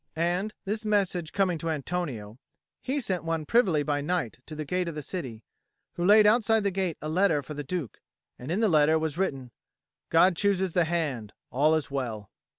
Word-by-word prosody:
And, 175 +6 -1
this 215 +3 -2
message 195 -6 0
coming 185 -4 +1
to 165 - -3
Antonio, 140 -8 -4 0.4
he 270 +3 -1
sent 190 -9 -2
one 165 -2 -2
privily 185 -8 +3
by 145 -1 -1
night 150 -7 -2
to 155 - -8
the 155 0 -5
gate 180 +3 -1
of 165 - -4
the 150 - -5
city, 125 - -6 0.5
who 175 - -3
laid 210 +3 +7
outside 225 0 +4
the 200 - +1
gate 185 -3 -2
a - - -3
letter 160 -2 +2
for 145 - -7
the 145 0 -5
Duke; 150 - -5 0.4
and 125 - -8
in 185 +7 0
the 225 - +4
letter 155 -2 +4
was 160 +1 -3
written, 135 -10 -2 0.6
"God 175 +2 +5
chooses 190 -2 +1
the 175 -2 +3
hand. 145 -11 -2 0.2
All 150 +4 +3
is 155 -3 -2
well." 115 -7 -4
165 Hz, 195 wpm, -27 LUFS, 145-190 Hz, 0.6 s, laid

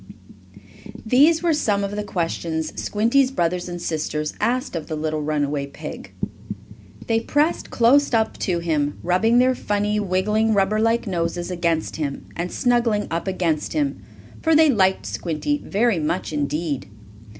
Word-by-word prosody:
These 295 +9 +4
were 335 -2 +3
some 205 -9 +1
of 200 +1 -3
the 210 - -2
questions 165 -4 -2
Squinty's 235 +6 +2
brothers 180 -6 -1
and 175 0 -5
sisters 155 -2 -2
asked 250 -4 0
of 160 -2 -4
the 160 - -3
little 155 0 -2
runaway 145 -1 -1
pig. 140 - -9 0.9
They 225 -1 +2
pressed 295 +7 0
close 265 +5 +4
up 225 -2 +1
to 180 -4 0
him, 155 -4 -1
rubbing 205 +7 +3
their 255 +1 +4
funny, 210 -2 -1
wiggling, 210 +3 +1
rubber 200 +2 +2
like 225 +2 +2
noses 175 -2 -2
against 170 -2 -1
him, 145 -3 -4
and 175 +1 -3
snuggling 235 -4 +1
up 165 +3 -2
against 170 -5 -1
him, 290 -2 -1 0.4
for 320 -1 +3
they 310 -1 +6
liked 190 - +2
Squinty 160 - -2
very 215 -2 +1
much 155 +2 -2
indeed. 145 -1 -2
190 Hz, 150 wpm, -22 LUFS, 160-230 Hz, 0.9 s, they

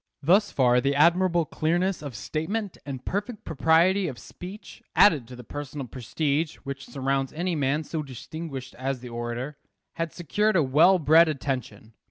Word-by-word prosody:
Thus 195 +7 +4
far 125 -2 +3
the 140 +2 +1
admirable 170 +2 +4
clearness 175 +5 0
of 140 -5 -7
statement 175 - -3
and 130 -3 -6
perfect 205 +3 -3
propriety 170 +5 +3
of 130 -6 -5
speech, 190 - -10
added 155 - +5
to 125 - -10
the 125 - -10
personal 145 +2 -6
prestige 145 +6 -2
which 140 0 -6
surrounds 135 -1 -1
any 175 +2 -1
man 145 +1 0
so 155 +1 -4
distinguished 135 0 -7
as 130 -1 -2
the 125 - -8
orator, 120 +4 -4 0.4
had 165 -1 -2
secured 210 +5 0
a 165 - +4
well 160 +8 +5
bred 160 0 +5
attention. 125 -7 -4
150 Hz, 160 wpm, -26 LUFS, 130-175 Hz, 0.4 s, added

